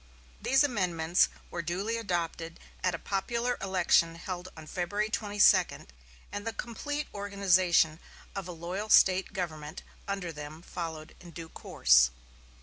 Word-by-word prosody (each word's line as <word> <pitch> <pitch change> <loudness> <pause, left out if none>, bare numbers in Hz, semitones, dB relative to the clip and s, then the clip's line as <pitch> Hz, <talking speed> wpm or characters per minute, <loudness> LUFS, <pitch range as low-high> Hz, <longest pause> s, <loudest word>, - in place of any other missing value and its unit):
These 270 +1 +4
amendments 180 - +2 0.2
were 170 - -3
duly 190 +7 -2
adopted 170 -5 -3 0.2
at 180 -2 +1
a - - -4
popular 235 +7 -2
election 180 -3 +3
held 180 +1 -6
on 160 - -9
February 205 +6 -2
22, 205 -1 +3 0.5
and 205 +2 -5
the 225 - -2
complete 290 +5 -4
organization 185 -5 +2 0.4
of 195 -2 -4
a - - -5
loyal 180 +5 -5
State 190 -2 +5
government 160 -3 -5 0.2
under 195 -4 -3
them 150 +1 -9
followed 160 -3 -6
in 175 - -12
due 165 -1 -9
course. 65 - +4
180 Hz, 135 wpm, -30 LUFS, 165-205 Hz, 0.5 s, State